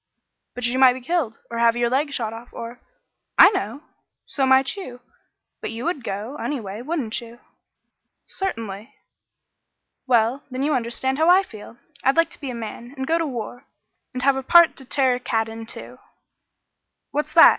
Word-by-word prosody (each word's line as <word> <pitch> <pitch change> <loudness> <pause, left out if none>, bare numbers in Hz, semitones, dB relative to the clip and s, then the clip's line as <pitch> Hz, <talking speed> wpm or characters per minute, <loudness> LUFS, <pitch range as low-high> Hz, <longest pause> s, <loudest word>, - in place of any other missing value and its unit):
"But 245 -1 -3
you 245 +2 0
might 260 -1 +7
be 255 - -8
killed, 270 -5 -1
or 230 - -3
have 235 0 +4
your 240 0 +2
leg 285 +3 +1
shot 225 -5 -2
off 230 +2 -10
or 235 +2 -8 0.3
" - - -56
"I - - +4
know. 375 -7 -3 0.4
So 270 -2 0
might 265 +3 +4
you 255 -12 -8 0.6
but - - -3
you 230 +1 -5
would 335 -7 -2
go, 220 +7 -4
anyway 225 -8 -4
wouldn't 260 -6 -2
you?" 235 0 -12 0.9
"Certainly." 225 - -5 1.1
"Well, 240 +2 +3
then 260 +1 -3
you 300 +1 +1
understand 260 +3 -1
how 320 +2 +4
I 370 +2 +7
feel. 225 - -12 0.3
I'd 270 +3 +3
like 330 0 +3
to - - -14
be 275 - -4
a 250 - -4
man, 235 +3 -7
and 265 - -2
go 330 +4 +1
to 330 - 0
war, 245 0 -6 0.4
and 255 -2 -4
'Have 275 0 +4
a - - -1
part 340 +5 +6
to 265 - -9
tear 260 0 +2
a 245 - -2
cat 225 -2 0
in,' 225 0 -8
too." 120 - -8 1.1
"What's - - -2
that? - - +10
255 Hz, 190 wpm, -23 LUFS, 230-280 Hz, 1.1 s, that